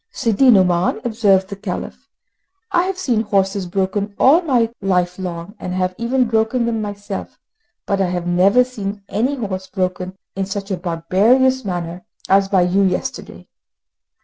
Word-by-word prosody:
"Sidi 235 Hz, +2 st, +2 dB
Nouman," 185 Hz, -3 st, +3 dB
observed 205 Hz, -5 st, +2 dB
the 200 Hz, -, -5 dB
Caliph, 200 Hz, -, -6 dB, 0.6 s
"I 355 Hz, -1 st, +2 dB
have 380 Hz, 0 st, -3 dB
seen 250 Hz, -12 st, 0 dB
horses 195 Hz, -2 st, 0 dB
broken 195 Hz, +2 st, -2 dB
all 300 Hz, +7 st, +5 dB
my 245 Hz, -8 st, +1 dB
life 180 Hz, -2 st, 0 dB
long, 175 Hz, 0 st, -5 dB
and 180 Hz, -, -5 dB
have 185 Hz, 0 st, 0 dB
even 250 Hz, +2 st, +1 dB
broken 225 Hz, +2 st, +1 dB
them 230 Hz, -2 st, -1 dB
myself, 205 Hz, -1 st, -6 dB, 0.5 s
but 195 Hz, -1 st, 0 dB
I 185 Hz, -, +1 dB
have 175 Hz, -1 st, -3 dB
never 185 Hz, +7 st, +4 dB
seen 205 Hz, -5 st, -6 dB
any 245 Hz, +8 st, 0 dB
horse 190 Hz, -6 st, -4 dB
broken 185 Hz, -1 st, -3 dB, 0.2 s
in 195 Hz, 0 st, -2 dB
such 200 Hz, 0 st, -5 dB
a 190 Hz, -, -1 dB
barbarous 205 Hz, +10 st, +2 dB
manner 175 Hz, -2 st, -4 dB, 0.2 s
as 195 Hz, 0 st, +3 dB
by 190 Hz, -3 st, +3 dB
you 180 Hz, +3 st, +2 dB
yesterday. 200 Hz, +8 st, -3 dB
200 Hz, 155 wpm, -19 LUFS, 185-230 Hz, 0.6 s, all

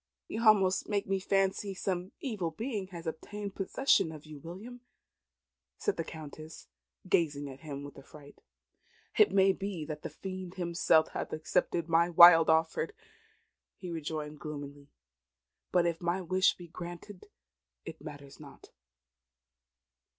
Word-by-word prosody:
"You 220 Hz, -, -4 dB
almost 195 Hz, -3 st, +4 dB
make 205 Hz, -1 st, 0 dB
me 195 Hz, 0 st, 0 dB
fancy 195 Hz, +1 st, 0 dB
some 185 Hz, 0 st, -3 dB
evil 220 Hz, -, -2 dB
being 210 Hz, +3 st, -4 dB
has 175 Hz, -3 st, -9 dB
obtained 200 Hz, +5 st, -5 dB
possession 195 Hz, -2 st, +2 dB
of 155 Hz, -1 st, -11 dB
you, 155 Hz, -2 st, -10 dB
William," 200 Hz, -, -9 dB, 1.0 s
said 415 Hz, -, -1 dB
the -, -, -2 dB
Countess, 155 Hz, 0 st, -10 dB, 0.4 s
gazing 145 Hz, -5 st, +1 dB
at 135 Hz, -1 st, -9 dB
him 140 Hz, -2 st, -7 dB
with 145 Hz, -, -10 dB
affright. 145 Hz, +1 st, -15 dB, 0.8 s
"It 425 Hz, -, +7 dB
may 195 Hz, 0 st, +5 dB
be 190 Hz, -5 st, -4 dB
that 150 Hz, -1 st, -6 dB
the -, -, -5 dB
Fiend 185 Hz, -1 st, -7 dB
himself 170 Hz, -3 st, +3 dB
hath -, -, -5 dB
accepted 165 Hz, +1 st, 0 dB
my 170 Hz, +1 st, +3 dB
wild 170 Hz, -1 st, +9 dB
offer," 160 Hz, -, +2 dB, 0.9 s
he 180 Hz, -2 st, -7 dB
rejoined 155 Hz, -2 st, -5 dB
gloomily; 145 Hz, -1 st, -8 dB, 0.8 s
"but 175 Hz, -1 st, +3 dB
if 170 Hz, 0 st, -1 dB
my 175 Hz, +2 st, 0 dB
wish 185 Hz, +1 st, +2 dB
be 175 Hz, -, -11 dB
granted 175 Hz, +3 st, -9 dB, 0.6 s
it -, -, -8 dB
matters 145 Hz, -2 st, -10 dB
not." 140 Hz, -3 st, -14 dB
170 Hz, 135 wpm, -31 LUFS, 155-190 Hz, 1.0 s, wild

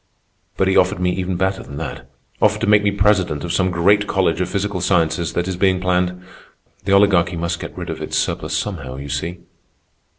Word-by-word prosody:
But 95 Hz, -, +2 dB
he 95 Hz, -, +2 dB
offered 90 Hz, +1 st, +3 dB
me 90 Hz, 0 st, 0 dB
even 90 Hz, 0 st, -2 dB
better 95 Hz, +1 st, 0 dB
than 70 Hz, -, -9 dB
that—offered 105 Hz, +7 st, -3 dB
to -, -, +1 dB
make 105 Hz, -1 st, +5 dB
me 100 Hz, -, +2 dB
president 100 Hz, -7 st, +1 dB
of 85 Hz, -, -3 dB
some 95 Hz, +1 st, +2 dB
great 100 Hz, +4 st, +3 dB
college 95 Hz, -3 st, +1 dB
of 90 Hz, -, -1 dB
physical 100 Hz, -2 st, -2 dB
sciences 85 Hz, -2 st, +1 dB
that 85 Hz, +1 st, -1 dB
is 95 Hz, -2 st, -3 dB
being 95 Hz, -1 st, +2 dB
planned—the 90 Hz, +1 st, -4 dB
Oligarchy 95 Hz, -3 st, +4 dB
must 85 Hz, +1 st, -2 dB
get -, -, -8 dB
rid -, -, -5 dB
of -, -, -7 dB
its -, -, -2 dB
surplus -, -, -1 dB
somehow, 75 Hz, -11 st, -4 dB
you 70 Hz, +1 st, -7 dB
see. 85 Hz, +5 st, -4 dB
90 Hz, 195 wpm, -20 LUFS, 85-100 Hz, -, make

